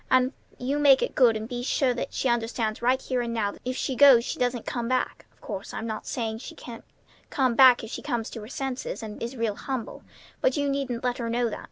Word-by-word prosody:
And 255 +1 +3 0.2
you 275 +4 -1
make 275 -2 +6
it - - -2
good 235 -4 +4
and 215 +1 -6 0.2
sure 255 0 +1
that 240 - -4
she - - -1
understands 230 -2 -1
right 255 +2 +3
here 255 -2 -2
and 235 -1 -3
now 205 -3 0
that - - -15
if 255 +1 -3
she 265 - -2
goes 260 -4 +7
she - - -4
doesn't 245 -2 -1
come 240 -2 -3
back. 255 0 -1
Of - - -33
course, 200 -2 -6
I'm 225 - -4
not 220 -1 -5
saying 225 -2 -3
she - - -9
can't 235 -2 -10 0.5
come 260 -3 +1
back 255 0 +7
if 225 - -7
she - - -5
comes 240 -5 -3
to 225 - -7
her 210 - -9
senses, 265 -2 -4
and 210 -1 -8
is 235 +3 -4
real 230 -2 0
humble; 260 -5 -5 0.4
but - - +2
you 285 0 +1
needn't 270 -4 -2
let 250 0 -1
her 230 -1 -2
know 235 0 0
that. - - -5
245 Hz, 245 wpm, -26 LUFS, 230-260 Hz, 0.5 s, goes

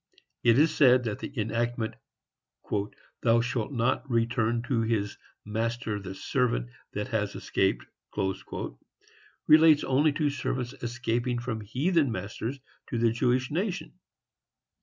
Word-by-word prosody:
It 115 0 +5
is 155 +3 +4
said 130 -3 +6
that 110 -3 -3
the - - -6
enactment, 115 +1 -1 1.3
"Thou 115 0 +4
shalt 120 0 -2
not 125 +2 0
return 115 0 +1
to 125 -2 0
his 110 -2 0 0.3
master 110 0 -2
the 95 -1 -7
servant 95 - 0 0.2
that - - -3
has - - -1
escaped," - - 0 0.3
&c., 95 -2 -1 1.0
relates 155 -1 +7
only 145 +4 +3
to 145 -1 +1
servants 130 -2 -3
escaping 120 +1 -1
from 120 -2 -3
heathen 140 - +1
masters 110 +7 -4 0.3
to 120 - -2
the 115 0 +3
Jewish 125 +2 +1
nation. 185 +4 -3
120 Hz, 125 wpm, -28 LUFS, 110-130 Hz, 1.3 s, relates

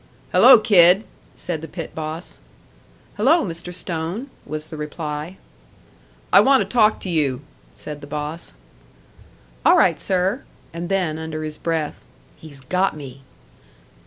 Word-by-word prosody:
"Hello, 255 0 +8
kid," 195 -3 +5 0.3
said 170 -3 -5
the 160 - -7
pit 165 -2 -7
boss. 160 +2 -6 0.8
"Hello, 285 +11 +3
Mr. 170 0 -6
Stone," 180 - -4 0.2
was 155 +2 -6
the - - -6
reply. 150 +3 -6 1.0
"I - - +9
want 270 0 +5
to - - 0
talk 220 -3 +3
to 190 - -5
you," 145 -6 0 0.3
said 150 -1 -9
the 145 - -10
boss. 150 - -6 1.1
"All - - +6
right, - - +3
sir." 190 +6 0 0.3
And 170 +1 -5
then, 180 -5 -1
under 160 -1 -5
his 155 -1 -6
breath, 160 -3 -3 0.3
"He's 145 -4 -13
got 180 +6 0
me!" 135 -2 -10
165 Hz, 135 wpm, -21 LUFS, 155-190 Hz, 1.1 s, I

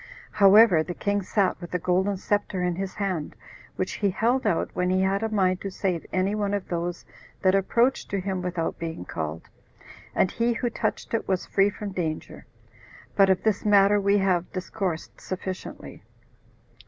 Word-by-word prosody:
However, 200 -3 +6
the 175 +2 -5
king 205 0 0
sat 190 -1 0
with 175 +1 -6
a - - +4
golden 185 +3 +1
scepter 200 -1 -1
in 180 -1 0
his 190 +1 -4
hand, 185 -7 -3 0.4
which 185 - -2
he 205 - +1
held 235 +7 +1
out 165 - 0
when 180 0 0
he 185 0 +2
had 195 +1 +1
a 225 - -1
mind 185 -4 +1
to 200 - -3
save 185 -3 -2
any 190 +2 +1
one 205 -1 0
of 200 - -4
those 175 0 -3 0.4
that 185 -1 +4
approached 235 +7 +2
to 200 - -1
him 190 -1 -3
without 175 -2 -3
being 165 - -5
called, 80 0 -5 0.7
and 185 - +2
he 235 +1 +1
who 240 0 -2
touched - - -3
it 230 - -1
was 190 -2 0
free 195 0 +3
from 205 0 -6
danger. 160 -4 -4 0.7
But 195 -1 +5
of 190 - +2
this 215 -3 +1
matter 205 0 +5
we 200 +1 +3
have 185 -3 +1
discoursed 185 -3 -4
sufficiently. 185 0 -6
190 Hz, 180 wpm, -26 LUFS, 180-205 Hz, 0.7 s, However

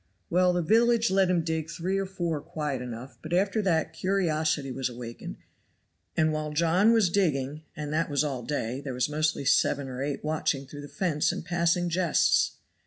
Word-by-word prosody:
Well, 180 +1 +4
the 175 -1 0
village 230 +3 +3
let 190 -1 +3
him 175 -2 +2
dig 160 -1 -2
three 180 +4 -2
or 195 - -2
four 170 -5 -2
quiet 150 -5 -4
enough; 125 +2 -8
but 160 +2 -6
after 195 +4 +2
that 170 -5 0
curiosity 160 -7 0
was 130 0 -2
awakened, 120 - -8 0.8
and 155 0 +3
while 155 0 -3
John 170 +7 +4
was 225 -4 +4
digging, 150 -6 0
and 150 0 -5
that 165 +1 0
was 145 0 +1
all 135 -4 -2
day, 125 -1 -3
there 135 -3 -5
was 125 +2 0
mostly 155 -1 0
seven 140 +1 +2
or 130 0 -6
eight 140 0 -3
watching 150 -3 -1
through 145 +2 -9
the 145 - -8
fence 155 -3 0
and - - -6
passing 175 0 +1
jests. 175 -1 +2
155 Hz, 185 wpm, -27 LUFS, 140-180 Hz, 0.8 s, Well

